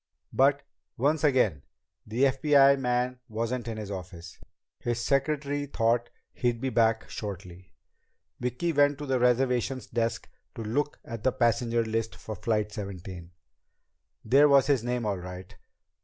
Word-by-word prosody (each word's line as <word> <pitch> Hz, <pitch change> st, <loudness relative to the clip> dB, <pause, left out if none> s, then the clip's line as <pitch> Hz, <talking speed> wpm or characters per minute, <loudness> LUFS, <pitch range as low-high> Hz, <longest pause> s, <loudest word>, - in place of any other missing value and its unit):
But, 140 Hz, +1 st, +3 dB, 0.3 s
once 145 Hz, +4 st, +1 dB
again, 125 Hz, -, +3 dB, 0.5 s
the 115 Hz, +5 st, 0 dB
FBI 140 Hz, 0 st, +5 dB
man 125 Hz, 0 st, 0 dB
wasn't 115 Hz, +2 st, -3 dB
in 115 Hz, -1 st, -4 dB
his 105 Hz, -2 st, -6 dB
office. 90 Hz, -3 st, -8 dB, 0.4 s
His 120 Hz, -1 st, -2 dB
secretary 145 Hz, +2 st, 0 dB
thought 120 Hz, -2 st, +1 dB, 0.2 s
he'd 120 Hz, -2 st, -1 dB
be 130 Hz, +2 st, -2 dB
back 115 Hz, -1 st, +2 dB
shortly. 90 Hz, -3 st, -8 dB, 0.6 s
Vicki 125 Hz, +8 st, -1 dB
went 145 Hz, -1 st, +3 dB
to 145 Hz, -, -6 dB
the 135 Hz, -2 st, 0 dB
reservations 125 Hz, +1 st, +1 dB
desk 115 Hz, 0 st, -2 dB, 0.3 s
to 115 Hz, -, -5 dB
look 145 Hz, +7 st, -1 dB
at 115 Hz, -3 st, -6 dB
the 130 Hz, -, +3 dB
passenger 115 Hz, -1 st, +1 dB
list 115 Hz, 0 st, -2 dB
for 110 Hz, -, -7 dB
Flight 105 Hz, +1 st, -1 dB
17. 95 Hz, -4 st, -7 dB, 1.0 s
There 140 Hz, +6 st, +6 dB
was 140 Hz, -2 st, +6 dB
his 135 Hz, -5 st, +2 dB
name, 120 Hz, -1 st, -2 dB
all 100 Hz, -3 st, -1 dB
right. 90 Hz, 0 st, -9 dB
120 Hz, 140 wpm, -28 LUFS, 110-135 Hz, 1.0 s, There